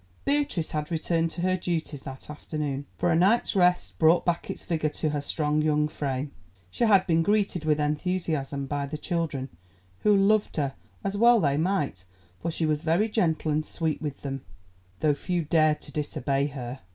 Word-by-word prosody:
Beatrice 280 - 0
had 150 -1 -2
returned 165 0 0
to 170 - -6
her 185 +1 +2
duties 165 -5 -3
that 135 -1 -9
afternoon, 150 -2 -4
for 175 0 +1
a - - +3
night's 200 +7 +3
rest 180 -1 +2
brought 165 +2 +5
back 170 -1 -1
its - - -5
vigour 155 -2 0
to 155 +1 -2
her 145 -1 -1
strong 150 +1 0
young 150 -1 +2
frame. 140 -1 -3 0.4
She 235 - +1
had 200 -4 +5
been 165 -1 +3
greeted 200 -3 +1
with 155 -1 +2
enthusiasm 150 -3 -1
by 140 0 -2
the 155 +2 -5
children, 155 -5 -2 0.5
who 210 -1 +4
loved 200 0 +2
her, 140 -3 0 0.3
as 195 +1 -2
well 235 +2 +6
they 140 -6 +2
might, 155 - -1 0.4
for 170 - -2
she 165 0 -1
was 150 -1 0
very 170 +7 +2
gentle 165 -7 +1
and 155 +1 +1
sweet 160 -1 -2
with 145 -3 -5
them, 135 -1 -4 0.6
though 150 - +4
few 175 +4 -2
dared 155 0 +3
to - - -12
disobey 140 -2 -1
her. 130 -2 -6
155 Hz, 185 wpm, -27 LUFS, 145-180 Hz, 0.6 s, well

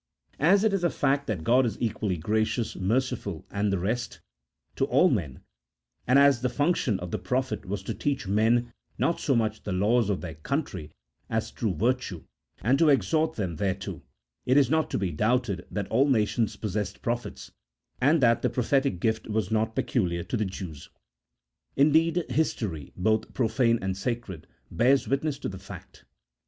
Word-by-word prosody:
As 190 +7 +4
it 220 -2 +2
is 195 -3 0
a 175 - +3
fact 140 -1 0
that 95 -8 -2
God 125 +8 +4
is 115 -4 -2
equally 105 -5 -1
gracious, 110 +5 -1
merciful, 110 -3 -1
and 100 0 0
the 100 - +1
rest, 110 +7 -2 0.6
to - - +2
all - - +4
men; 65 - -2 0.7
and 125 +3 +5
as 140 -3 +5
the 125 - +1
function 140 - +1
of 90 -1 -6
the - - -2
prophet 110 +1 -2
was 95 0 -3
to - - -3
teach 140 -5 -2
men 115 +4 +2 0.2
not 170 - +1
so 135 - +1
much 110 -2 0
the 105 - -5
laws 105 +4 +2
of 100 - -1
their 85 -3 -6
country, 90 - -4 0.4
as 110 0 -2
true 105 -6 -2
virtue, 115 -4 -1 0.4
and 130 +6 +3
to 165 - +5
exhort 155 - +2
them 90 -7 -3
thereto, 95 +1 -3 0.5
it 130 +2 +4
is 140 -2 +4
not 160 -1 +2
to - - -1
be 95 -3 -1
doubted 105 +1 0
that 100 -2 -3
all 135 +5 +3
nations 110 -2 +1
possessed 105 -2 -4
prophets, 120 0 -4 0.5
and 145 +4 +4
that 115 -2 +4
the 125 - +1
prophetic 130 -2 0
gift 110 +2 -1
was 110 -3 -1
not 110 0 0
peculiar 85 -8 0
to - - -4
the 110 -2 0
Jews. 90 -6 -7 0.9
Indeed, 160 +4 +3
his 160 -1 +1
tory, 80 - -5
both 110 +3 0
profane 115 0 +2
and 95 -1 -1
sacred, 100 -5 -4 0.2
bears 130 +3 +3
witness 140 +1 0
to - - -5
the 95 -2 -7
fact. - - -12
115 Hz, 175 wpm, -27 LUFS, 100-135 Hz, 0.9 s, and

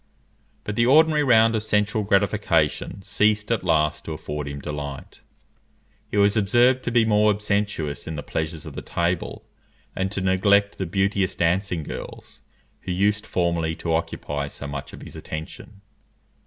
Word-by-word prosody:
But 105 - -4
the 120 +2 +3
ordinary 155 +2 +5
round 115 -4 +5
of 110 - 0
sensual 105 0 +1
gratification 100 0 +1
ceased 105 +2 +1
at 115 - 0
last 75 -2 +1
to 80 - -4
afford 75 -1 -5
him 70 0 -5
delight; 70 -1 -7 0.9
he - - -3
was 100 0 +4
observed 120 +5 +3
to 120 - -1
be 115 -1 +4
more 105 -1 +4
abstemious 100 -8 -2
in 80 - -4
the 75 - -5
pleasures 80 0 -4
of - - -8
the - - -6
table, 85 0 -2 0.5
and 95 0 -1
to 100 - -3
neglect 100 +2 +2
the 95 - -2
beauteous 95 +1 0
dancing 90 0 0
girls - - -9 0.4
who - - -6
used 100 +3 +1
formerly 85 -2 0
to 85 -1 -2
occupy 75 -3 -2
so 70 - -8
much 70 -1 -6
of - - -11
his - - -10
attention. 80 +6 -8
95 Hz, 160 wpm, -24 LUFS, 80-105 Hz, 0.9 s, ordinary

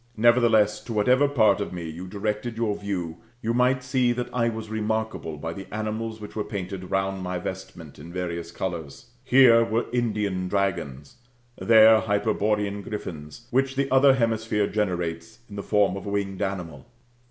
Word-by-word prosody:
Nevertheless, 115 -2 +4
to 115 - -5
whatever 125 +7 +3
part 110 -7 +3
of - - -4
me 85 -2 -5
you 85 +4 -7
directed 105 +4 -3
your 110 -3 0
view, 90 -5 -4 0.3
you 115 +1 0
might 125 +1 +2
see 130 -1 +1
that 120 0 -4
I 115 -1 +1
was 110 -1 -6
remarkable 110 -6 -3
by 80 +3 -5
the 95 +2 -10
animals 110 +1 -4
which 105 -1 -10
were 110 - -1
painted 95 -2 -6
round 95 0 -1
my 90 0 -3
vestment 90 -5 -8
in 85 +4 -10
various 85 -2 -4
colours. 85 0 -6
Here 125 -3 +6
were 115 +1 -1
Indian 105 -6 -1
dragons, 85 -9 -2 0.4
there 110 -1 +6
Hyperborean 105 -1 0
griffins, 85 -2 -7
which 135 +1 +1
the 135 0 -1
other 135 0 +6
hemisphere 110 -3 0
generates 90 -3 -3
in 100 - -11
the 100 - -4
form 100 -2 +2
of 100 - -7
a - - -2
winged 100 -1 -2
animal. 90 -7 -4
105 Hz, 165 wpm, -25 LUFS, 90-115 Hz, 0.4 s, Here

